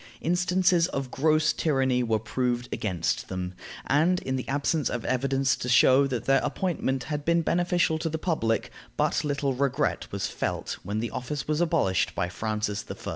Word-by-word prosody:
Instances 180 0 +2
of 135 -6 -4
gross 155 +1 +2
tyranny 135 -5 +1
were 115 -2 +1
proved 120 +3 -2
against 90 -6 -1
them, 90 -1 -4 0.3
and, 165 +6 +3
in 130 - -2
the 130 - -4
absence 145 +1 0
of 120 - -4
evidence 135 +1 +1
to 125 - -5
show 130 +3 +5
that 125 -4 -3
their 135 - +4
appointment 145 -8 -1
had 150 -1 -4
been 170 +2 +2
beneficial 175 -1 +1
to 165 - -2
the 160 - -2
public, 115 - -1 0.3
but - - +1
little 140 -2 0
regret 140 +2 -1
was 100 -1 -2
felt - - -3
when 105 +4 -3
the 115 -1 -3
office 130 +4 -4
was 155 +2 0
abolished 155 - +1
by 90 - -1
Francis 105 +1 -2
I. - - -7
135 Hz, 175 wpm, -27 LUFS, 120-160 Hz, 0.3 s, show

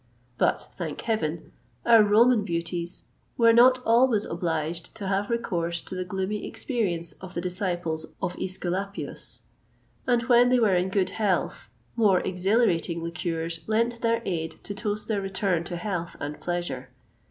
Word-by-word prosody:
But, - - +1
thank - - -5
Heaven! 170 -8 -2 0.3
our 230 -2 +7
Roman 220 +2 +5
beauties 170 -1 -3 0.3
were 230 -1 +6
not 250 +2 +6
always 230 -2 +4
obliged 165 -1 -3
to 200 - -5
have 200 +1 0
recourse 175 -8 -1
to - - -9
the 185 0 -2
gloomy 190 +3 -3
experience 175 - -2
of 190 -1 -9
the - - -1
disciples 175 -3 -2
of 185 -2 -2
Æsculapius; 190 +2 -3 0.7
and 240 -1 +3
when 245 0 +5
they 250 - +4
were 220 -5 +3
in 180 +1 +2
good 190 -1 +1
health, 205 -5 -1 0.3
more 205 -5 +4
exhilarating 180 -3 +1
liqueurs 165 -1 -3
lent 230 +2 +1
their 230 0 +1
aid 160 -4 -2
to 205 - -5
toast 210 0 -3
their 210 -3 0
return 190 -3 0
to 175 - -4
health 175 -2 -3
and 145 +1 -5
pleasure. 175 0 -3
190 Hz, 150 wpm, -26 LUFS, 170-225 Hz, 0.7 s, our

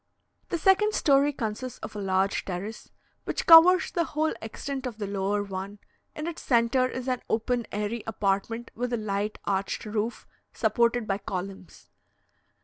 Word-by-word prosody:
The 345 - 0
second 390 +5 +3
story 280 -1 +4
consists 245 -1 -4
of - - -7
a - - -4
large 190 0 +1
terrace, 195 +4 -6 0.4
which - - -2
covers 340 +2 +8
the 340 - +1
whole 310 0 -1
extent 265 +4 -5
of 235 -3 -7
the 210 - -3
lower 200 +1 -1
one; 195 +1 -6 0.4
in 305 - -4
its 335 -1 -5
centre 240 +1 +2
is 255 0 -6
an 255 -1 -1
open 235 +1 0
airy 210 +2 -3
apartment 220 +2 -1
with 245 +1 -3
a - - +1
light 210 0 -2
arched 195 +2 -1
roof, 215 +2 -3 0.3
supported 235 -1 +1
by 195 -1 -1
columns. 190 -1 -7
225 Hz, 155 wpm, -27 LUFS, 200-260 Hz, 0.4 s, covers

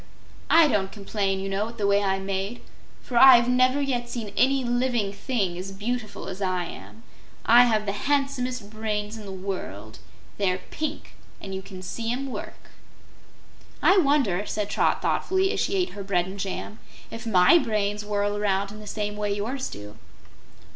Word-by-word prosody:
I 330 -1 +7
don't 200 -7 0
complain, 200 -2 -2
you 195 - -4
know, 195 +3 -1
at 230 - -12
the 205 - -1
way 200 0 +3
I'm 195 -1 -1
made, 195 +4 -3 0.4
for 245 - -3
I've 245 -2 +8
never 255 +2 +3
yet 250 -4 -1
seen 225 -4 -5
any 270 +3 +3
living 240 -4 0
thing 200 -6 -2
as 190 +1 -6
beautiful 215 +2 -4
as 190 +1 -6
I 185 -2 0
am. 105 -4 -11 0.4
I 240 +2 +7
have 215 -3 +1
the 200 - 0
handsomest 250 -2 -1
brains 215 -1 -3
in 215 -2 -9
the - - -6
world. 185 - -6 0.4
They're 185 -2 +1
pink, 310 -1 -4 0.3
and 195 - -7
you 190 - -4
can 185 -1 -10
see 230 +5 -3
'em 265 +2 -3
work." - - -8 1.1
"I 385 - +6
wonder," 275 - +2
said 210 -1 -3
Trot - - +1
thoughtfully, 380 +1 +1
as - - -2
she - - 0
ate 365 -2 +1
her 200 - -7
bread 180 -3 +1
and 190 +2 -8
jam, 195 +3 -5 0.3
"if 230 +1 -7
MY 190 - +6
brains 210 -4 -1
whirl 205 0 -1
around 200 -1 0
in 210 - -10
the 210 - -11
same 210 0 -3
way 210 -1 -2
yours 230 +7 -3
do." 105 +1 -10
210 Hz, 180 wpm, -25 LUFS, 195-245 Hz, 1.1 s, I've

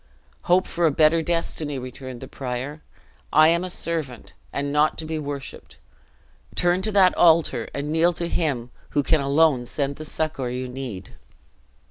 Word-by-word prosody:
"Hope 185 +2 +5
for 170 -1 +1
a - - +2
better 155 +3 +4
destiny," 160 -3 -2
returned 130 0 -8
the 130 - -7
prior; 130 +4 -5 0.5
"I 155 +1 +6
am 170 +1 +2
a 185 - -4
servant, 155 - -3 0.2
and 140 0 -2
not 150 +1 +3
to 160 - -5
be 160 0 -3
worshiped; 140 -3 -7 0.8
turn 175 +1 +2
to 215 - -2
that 190 -2 +5
altar, 165 -1 +4
and 145 +1 -4
kneel 165 +2 +4
to 170 0 -3
Him 135 -9 -1 0.3
who 145 - +4
can 155 +1 +2
alone 140 -3 +3
send 140 +1 -2
the 155 - -7
succor 155 -5 -2
you 125 +1 -4
need!" 125 -7 -7
150 Hz, 165 wpm, -24 LUFS, 135-165 Hz, 0.8 s, I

